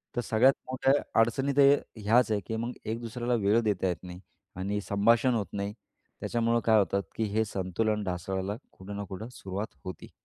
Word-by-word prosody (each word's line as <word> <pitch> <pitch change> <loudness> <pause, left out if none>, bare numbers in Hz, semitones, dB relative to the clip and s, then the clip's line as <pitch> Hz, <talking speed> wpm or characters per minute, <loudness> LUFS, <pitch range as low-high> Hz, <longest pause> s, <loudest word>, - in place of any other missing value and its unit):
तर 120 - +1
सगळ्यात 120 +4 +4 0.2
मोठ्या 130 +1 +3 0.3
अडचणी 120 +5 +2
तर 140 0 +7 0.2
ह्याच 110 +2 +3
आहे 105 - +2
की 110 - -2
मग 120 +2 -3
एक 110 +1 -2
दुसऱ्याला 120 +1 -2
वेळ 105 +4 +4
देता 100 -3 +1
येत 90 -1 -3
नाही 90 0 -8 0.4
आणि 100 +3 -2
संभाषण 115 +5 +4
होत 105 -4 -1
नाही. 100 0 -3 0.5
त्याच्यामुळं 115 0 +1
काय 110 -1 +6
होतं 100 0 +1
की 115 - -1
हे 110 +1 +2
संतुलन 105 +2 -1
ढासळायला 95 +2 -3 0.2
कुठं 100 +2 -9
ना 100 - -3
कुठं 105 +5 -6
सुरुवात 100 +3 -5
होती. 95 - -8
110 Hz, 180 wpm, -29 LUFS, 100-115 Hz, 0.5 s, तर